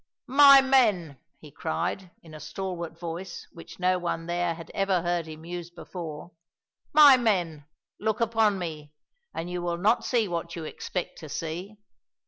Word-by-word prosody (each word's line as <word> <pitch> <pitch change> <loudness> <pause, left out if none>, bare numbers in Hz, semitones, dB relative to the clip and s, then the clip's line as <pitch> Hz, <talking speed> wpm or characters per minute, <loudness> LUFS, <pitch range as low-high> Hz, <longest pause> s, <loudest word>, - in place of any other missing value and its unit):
"My 275 +1 +8
men," 210 - +2 0.2
he - - -14
cried, 180 - -3
in 160 -2 -14
a 155 - -9
stalwart 170 +1 -6
voice 170 +2 -6
which 165 0 -13
no 185 0 +2
one 170 -1 -3
there 175 0 -1
had 165 0 -11
ever 195 -3 +1
heard 175 -2 -1
him 160 0 -10
use 175 0 -6
before, 170 -2 -8 0.6
"my 290 -3 +8
men, 175 - -1 0.3
look 220 -1 -1
upon 225 -3 +2
me 155 -4 -6 0.4
and 165 - -5
you 180 0 -4
will 175 -1 -2
not 215 +7 +2
see 235 -4 +1
what 170 -1 -4
you 165 - -6
expect 175 +3 -5
to 155 - -10
see! 170 +8 -5
175 Hz, 160 wpm, -27 LUFS, 165-200 Hz, 0.6 s, My